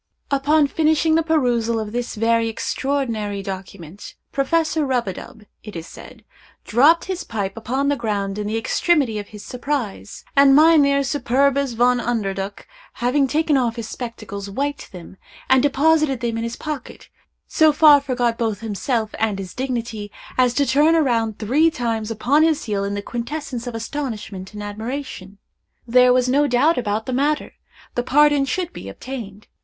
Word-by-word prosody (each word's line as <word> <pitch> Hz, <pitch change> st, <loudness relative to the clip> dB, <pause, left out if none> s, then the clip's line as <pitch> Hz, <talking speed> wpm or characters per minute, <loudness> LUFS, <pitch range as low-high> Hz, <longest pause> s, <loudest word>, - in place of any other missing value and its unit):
Upon 290 Hz, +2 st, +3 dB
finishing 315 Hz, +2 st, +2 dB
the 325 Hz, -, +4 dB
perusal 245 Hz, -8 st, +1 dB
of 215 Hz, -1 st, -5 dB
this 240 Hz, +1 st, -3 dB
very 230 Hz, +1 st, +1 dB
extraordinary 225 Hz, -5 st, -2 dB
document, 190 Hz, -2 st, -8 dB, 0.2 s
Professor 315 Hz, +3 st, +1 dB
Rub 255 Hz, -5 st, 0 dB
a 190 Hz, -, -2 dB
dub, 215 Hz, +4 st, -11 dB, 0.2 s
it 210 Hz, -3 st, -10 dB
is 165 Hz, -1 st, -6 dB
said, -, -, -13 dB, 0.4 s
dropped 290 Hz, +9 st, +4 dB
his 375 Hz, -1 st, -4 dB
pipe 200 Hz, -4 st, -4 dB
upon 260 Hz, +5 st, -2 dB
the 285 Hz, -, +2 dB
ground 205 Hz, -4 st, -2 dB
in 205 Hz, -, -3 dB
the 220 Hz, +2 st, -1 dB
extremity 255 Hz, -2 st, +1 dB
of 205 Hz, -, -7 dB
his 210 Hz, -1 st, -11 dB
surprise, 250 Hz, -6 st, -4 dB
and 275 Hz, -1 st, +6 dB
Mynheer 290 Hz, -3 st, +5 dB
Superbus 275 Hz, 0 st, +1 dB
Von 245 Hz, +2 st, +3 dB
Underduk 200 Hz, -5 st, -3 dB, 0.3 s
having 265 Hz, +3 st, +1 dB
taken 300 Hz, +1 st, +1 dB
off 240 Hz, -3 st, 0 dB
his 230 Hz, -2 st, -5 dB
spectacles, 215 Hz, -5 st, -7 dB
wiped 285 Hz, +7 st, -4 dB
them, 180 Hz, +1 st, -11 dB, 0.3 s
and 260 Hz, -1 st, +5 dB
deposited 290 Hz, 0 st, +2 dB
them 235 Hz, -1 st, -2 dB
in 230 Hz, -, -2 dB
his 230 Hz, 0 st, -4 dB
pocket, 300 Hz, -4 st, -7 dB, 0.4 s
so 315 Hz, -2 st, +4 dB
far 295 Hz, -1 st, +6 dB
forgot 245 Hz, -4 st, -1 dB
both 220 Hz, -3 st, -1 dB
himself 220 Hz, +1 st, -2 dB
and 215 Hz, -3 st, 0 dB
his 190 Hz, -2 st, -7 dB
dignity, 235 Hz, -5 st, -4 dB, 0.2 s
as 250 Hz, -1 st, +2 dB
to 285 Hz, -, +2 dB
turn 295 Hz, +6 st, +4 dB
round 230 Hz, -5 st, 0 dB
three 275 Hz, +10 st, +3 dB
times 230 Hz, -6 st, -3 dB
upon 245 Hz, +7 st, +2 dB
his 320 Hz, -1 st, +2 dB
heel 205 Hz, -2 st, -2 dB
in 200 Hz, 0 st, -2 dB
the 205 Hz, -, -4 dB
quintessence 245 Hz, +1 st, -5 dB
of 240 Hz, -, -5 dB
astonishment 225 Hz, -6 st, -5 dB
and 210 Hz, -, -6 dB
admiration. 215 Hz, -2 st, -6 dB, 0.5 s
There 250 Hz, +1 st, +5 dB
was 250 Hz, 0 st, +3 dB
no 285 Hz, +3 st, +3 dB
doubt 280 Hz, +5 st, +3 dB
about 220 Hz, -1 st, -2 dB
the 260 Hz, -, -3 dB
matter—the 285 Hz, -2 st, -3 dB
pardon 290 Hz, +2 st, +3 dB
should 350 Hz, +6 st, -3 dB
be -, -, -8 dB
obtained. 215 Hz, -6 st, -8 dB
245 Hz, 165 wpm, -21 LUFS, 215-285 Hz, 0.5 s, and